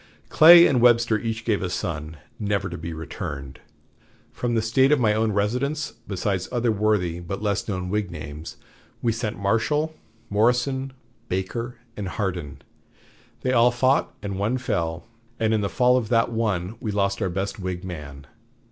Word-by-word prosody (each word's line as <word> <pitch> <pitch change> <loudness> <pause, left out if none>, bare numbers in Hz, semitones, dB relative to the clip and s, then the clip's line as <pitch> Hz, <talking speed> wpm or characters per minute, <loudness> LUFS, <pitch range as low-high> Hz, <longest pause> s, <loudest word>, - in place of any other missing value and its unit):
Clay 170 +2 +9
and 130 -4 +3
Webster 115 -2 +4
each 115 +1 -4
gave 110 -4 +1
a 90 - -2
son, 80 -3 -4 0.2
never 100 -2 -1
to 85 - -5
be 85 +1 -5
returned. 70 -3 -6 0.7
From 120 -1 -2
the 115 - +2
State 130 +5 +3
of 150 - +4
my 110 -3 +3
own 110 0 +1
residence, 125 +9 -1
besides 95 -1 -2
other 120 -2 +1
worthy 105 -5 +1
but 90 +4 -6
less 100 -2 -1
known 95 -3 -3
Whig 105 0 -1
names, 75 -1 -8 0.5
we 120 - +3
sent 110 -1 -3
Marshall, 115 +10 0 0.3
Morrison, 125 +5 +1 0.4
Baker, 115 +7 -3 0.2
and 100 -2 -4
Hardin; 90 -7 -4 0.8
they 130 - 0
all 120 0 +6
fought 130 +3 +2
and 100 -1 -4
one 110 +6 0
fell, 85 -9 -2 0.3
and 110 -1 +2
in 110 - +2
the 100 - -1
fall 125 +3 +3
of 115 -4 -2
that 115 0 +2
one 105 -3 -1
we 110 - -4
lost 100 -1 0
our 95 - +1
best 95 +4 -3
Whig 90 -1 -4
man. 75 -6 -8
105 Hz, 165 wpm, -24 LUFS, 90-120 Hz, 0.8 s, Clay